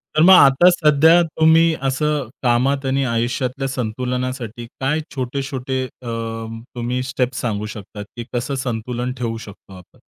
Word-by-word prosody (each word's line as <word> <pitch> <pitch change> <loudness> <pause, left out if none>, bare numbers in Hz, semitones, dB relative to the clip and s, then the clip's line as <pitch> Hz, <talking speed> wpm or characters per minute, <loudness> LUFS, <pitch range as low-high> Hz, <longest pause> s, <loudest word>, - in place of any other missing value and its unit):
तर 155 - +4
मग 190 +2 +8
आता 175 +1 +7
सध्या 160 +1 +5
तुम्ही 160 0 +4
असं 145 0 0 0.2
कामात 135 +3 +1
आणि 135 +1 +1
आयुष्यातल्या 125 +3 -1
संतुलनासाठी 125 -1 -4
काय 140 +4 0 0.2
छोटे-छोटे 130 0 -3
अ, 125 -1 -13 0.7
तुम्ही 120 +1 -2
स्टेप्स 130 -1 -2
सांगू 105 -3 -2
शकता, 105 0 -9
की 115 +3 -8
कसं 125 +3 -2
संतुलन 120 +1 -3
ठेवू 115 -2 -3
शकतो 100 -3 -12
आपण? 90 - -18
130 Hz, 135 wpm, -20 LUFS, 120-140 Hz, 0.7 s, मग